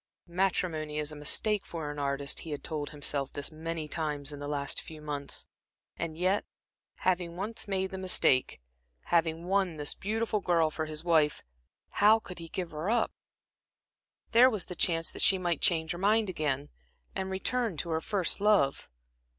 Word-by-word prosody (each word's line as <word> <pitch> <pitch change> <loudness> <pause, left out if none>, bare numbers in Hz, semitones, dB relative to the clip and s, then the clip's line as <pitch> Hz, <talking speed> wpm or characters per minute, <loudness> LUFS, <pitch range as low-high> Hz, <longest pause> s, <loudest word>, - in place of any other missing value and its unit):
Matrimony 170 -4 0
is 150 0 -1
a - - -8
mistake 205 +8 +1
for 160 -3 -5
an 145 - -6
artist 140 0 0
he 165 - -8
had 145 -2 -4
told 150 -2 -3
himself 145 -2 -1
this 145 +2 -4
many 160 0 -4
times 150 -2 -2
in 145 - -7
the 145 - -5
last 140 -1 -2
few 160 -1 -10
months. 145 -2 -4 0.5
And 160 -2 -4
yet, 185 +4 +2 0.6
having 175 -2 0
once 210 +4 -4
made 190 -1 0
the 190 - -5
mistake, 180 - +3 0.5
having 165 0 +2
won 190 -3 +1
this 145 -1 +1
beautiful 220 +1 -1
girl 165 -4 +2
for 155 0 -2
his 155 0 -5
wife, 160 -4 +3 0.6
how 215 +2 +8
could 185 -5 -9
he 165 -1 -8
give 175 -1 -4
her 155 +5 -3
up. 235 0 +2 1.2
There 245 +3 +8
was 215 -6 -2
the 180 - -7
chance 165 -1 +2
that - - -5
she 195 - +5
might 175 -4 -1
change 165 -4 +3
her 175 - -4
mind 210 +1 +3
again, 145 -3 -1 0.5
and 190 0 -2
return 210 +1 0
to 170 +3 -2
her 160 0 0
first 195 +1 +1
love. 200 -10 +3
165 Hz, 175 wpm, -30 LUFS, 150-190 Hz, 1.2 s, how